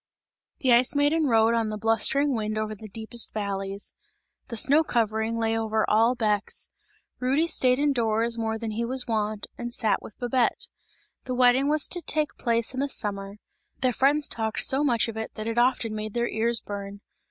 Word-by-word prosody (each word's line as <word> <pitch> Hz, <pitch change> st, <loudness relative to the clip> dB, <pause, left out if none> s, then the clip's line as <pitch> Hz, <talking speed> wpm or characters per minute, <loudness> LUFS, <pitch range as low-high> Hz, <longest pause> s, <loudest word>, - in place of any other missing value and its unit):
The 255 Hz, -3 st, +4 dB
Ice 245 Hz, +4 st, +4 dB
Maiden 295 Hz, +2 st, +2 dB
rode 225 Hz, -1 st, +4 dB
on 225 Hz, -2 st, 0 dB
the 215 Hz, -, -4 dB
blustering 225 Hz, +6 st, +2 dB
wind 215 Hz, -1 st, -2 dB
over 215 Hz, 0 st, -2 dB
the 215 Hz, +1 st, -10 dB
deepest 225 Hz, +3 st, -1 dB
valleys. 200 Hz, -1 st, -4 dB, 0.5 s
The 230 Hz, -, -6 dB
snow 285 Hz, +8 st, +4 dB
covering 220 Hz, -3 st, 0 dB
lay 225 Hz, 0 st, 0 dB
over 220 Hz, -1 st, 0 dB
all 230 Hz, +3 st, +3 dB
Bex; 210 Hz, -3 st, 0 dB, 0.5 s
Rudy 270 Hz, +6 st, +1 dB
stayed 255 Hz, -6 st, +3 dB
in 290 Hz, 0 st, +2 dB
doors 230 Hz, -1 st, 0 dB
more 225 Hz, -1 st, -2 dB
than 225 Hz, -1 st, -4 dB, 0.2 s
was 260 Hz, +1 st, +1 dB
his -, -, -4 dB
wont, 215 Hz, -2 st, -2 dB
and 240 Hz, 0 st, -4 dB
sat 220 Hz, -4 st, +1 dB
with 215 Hz, -, -12 dB
Babette. 245 Hz, 0 st, 0 dB, 0.6 s
The 255 Hz, -1 st, -3 dB
wedding 255 Hz, +3 st, +4 dB
was 305 Hz, 0 st, +3 dB
to 350 Hz, -, -2 dB
take 305 Hz, -3 st, -1 dB
place 235 Hz, 0 st, +1 dB
in 260 Hz, -, -4 dB
the 280 Hz, +1 st, 0 dB
summer; 200 Hz, -4 st, -3 dB, 0.5 s
their 255 Hz, -1 st, +2 dB
friends 285 Hz, +4 st, +2 dB
talked 220 Hz, -1 st, -1 dB
so 270 Hz, +2 st, +2 dB
much 240 Hz, -6 st, +2 dB
of 225 Hz, -1 st, -6 dB
it 220 Hz, -, -5 dB
that 215 Hz, -, -5 dB
it 230 Hz, +1 st, -1 dB
often 240 Hz, -3 st, +1 dB
made 215 Hz, 0 st, -5 dB
their 240 Hz, 0 st, +1 dB
ears 230 Hz, +1 st, 0 dB
burn. 200 Hz, 0 st, -7 dB
230 Hz, 190 wpm, -26 LUFS, 215-255 Hz, 0.6 s, The